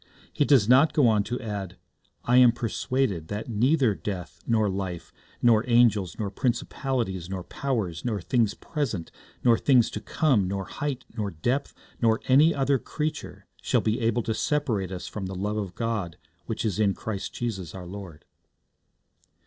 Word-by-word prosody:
He 145 - +2
does 130 -8 +5
not 130 +6 +5
go 145 -5 +4
on 105 -2 +3
to 125 - -3
add, 100 -6 -5 0.5
'I 125 +1 +4
am 125 -2 +8
persuaded 120 -6 -1
that 105 +5 -5
neither 125 +2 +3
death, 95 -3 -6
nor 110 -2 +2
life, 95 -3 -4 0.3
nor 115 -2 +5
angels, 110 -8 +3
nor 105 -3 -3
principalities, 120 - -2
nor 95 -2 -4
powers, 100 -7 -3
nor 110 -4 -1
things 110 +3 +1
present, 120 - -3 0.3
nor 120 -2 +5
things 125 -5 +4
to - - -5
come, 130 - +2
nor 95 0 -3
height, 145 +2 -4
nor 105 -3 -2
depth, 120 - -2 0.3
nor 115 -1 +3
any 145 +5 +6
other 135 -2 +1
creature, 150 +7 -5 0.2
shall - - +1
be 110 +3 0
able 115 0 +1
to 110 - -1
separate 110 - -1
us 90 -1 -5
from 100 -3 -5
the 95 - -6
love 105 +3 -2
of 100 -4 -4
God, 110 -8 -2 0.3
which 115 0 -3
is 105 -2 -1
in 100 -3 +2
Jesus 105 -3 -4 0.4
Christ - - -12
our 90 -1 -7
Lord.' 90 -4 -9
110 Hz, 165 wpm, -26 LUFS, 95-125 Hz, 0.5 s, am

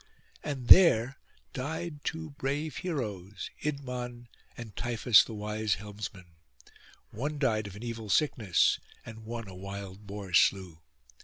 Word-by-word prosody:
And 135 -5 -4
there 135 -8 +7 0.3
died 150 +2 -4
two 160 +2 -4
brave 145 +2 -3
heroes, 105 - -4
Idmon 125 -4 -4 0.3
and 110 -4 -9
Tiphys 120 -2 +5
the 115 - -8
wise 105 0 -1
helmsman: 100 -4 -8 0.7
one 145 +7 -3
died 110 -7 +1
of 100 - -9
an 105 - -9
evil 115 -2 -5
sickness, 105 - +3 0.3
and 110 -1 -9
one 115 -1 -5
a 95 - -9
wild 100 +1 -8
boar 100 -2 -7
slew. 85 -1 +3
115 Hz, 130 wpm, -30 LUFS, 100-135 Hz, 0.7 s, there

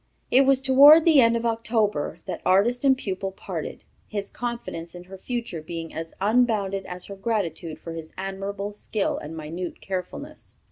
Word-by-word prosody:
It 265 +2 +5
was 270 -1 +4
toward 285 +4 +8
the 315 -5 +7
end 230 0 +4
of 230 - -4
October 220 -8 0
that - - -5
artist 225 +7 +3
and 265 -2 +5
pupil 195 -4 -3
parted, 190 - -6 0.2
his 205 -2 -4
confidence 235 -9 -5
in 175 - -9
her 190 +1 -11
future 235 -8 -4
being 165 0 -6
as 160 +1 -5
unbounded 205 -3 +1
as 180 0 -6
her 200 - -8
gratitude 190 -6 -2
for 165 - -8
his 160 -1 -8
admirable 195 +1 -4
skill 210 0 -2
and 160 +2 -8
minute 165 +3 -6
carefulness." 195 - -6
200 Hz, 170 wpm, -25 LUFS, 180-235 Hz, 0.2 s, toward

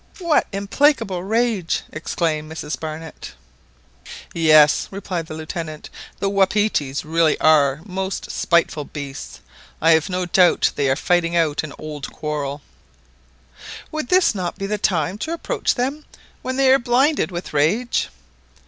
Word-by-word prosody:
What 340 -5 +2
implacable 200 -1 +1
rage 220 -4 0
!" - - -28
exclaimed 155 -1 -2
Mrs 155 -1 -5
Barnett. 160 0 -7 1.0
"Yes," 155 -3 +5
replied 185 -4 -5
the 155 - -7
Lieutenant; 155 -1 -6 0.3
"the 200 - 0
wapitis 195 -8 +1
really 160 0 +2
are 150 -2 +4
most 190 0 -4
spiteful 170 -3 +1
beasts. 140 -1 -8 0.4
I 165 - +4
have 160 +3 +3
no 180 0 -1
doubt 175 0 +4
they 140 -2 +1
are 135 - +3
fighting 175 +2 +1
out 160 -4 +2
an 150 -3 -8
old 150 -3 -7
quarrel." 145 -2 -4 1.3
"Would 310 -5 -4 0.2
not 185 -4 -3
this - - -27
be 195 - -4
the 210 +1 -2
time 180 +1 0
to 320 - -3
approach 335 - -1
them, 275 +5 -2 0.4
when 260 0 -3
they 265 -1 +4
are 270 - +4
blinded 260 +4 +2
with 175 -3 -6
rage?" 195 +12 +1
170 Hz, 140 wpm, -21 LUFS, 155-205 Hz, 1.3 s, Yes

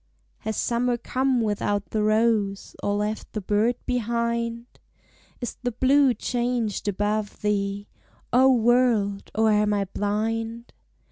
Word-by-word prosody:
Has 220 -1 -4
summer 240 +1 0
come 255 +1 0
without 205 -1 -1
the 215 - 0
rose, 215 -2 +1
Or 205 - 0
left 210 +1 -3
the 215 - -2
bird 210 +5 +1
behind? 235 -1 -1 0.8
Is 240 - -5
the 245 -1 -1
blue 265 +1 +4
changed 240 -3 -2
above 205 +1 -1
thee, 200 -1 -1 0.5
O 260 +2 +6
world! 235 -4 +2
or 220 0 +3
am 210 0 +2
I 200 -1 0
blind? 225 +4 -3
225 Hz, 125 wpm, -25 LUFS, 205-240 Hz, 0.8 s, O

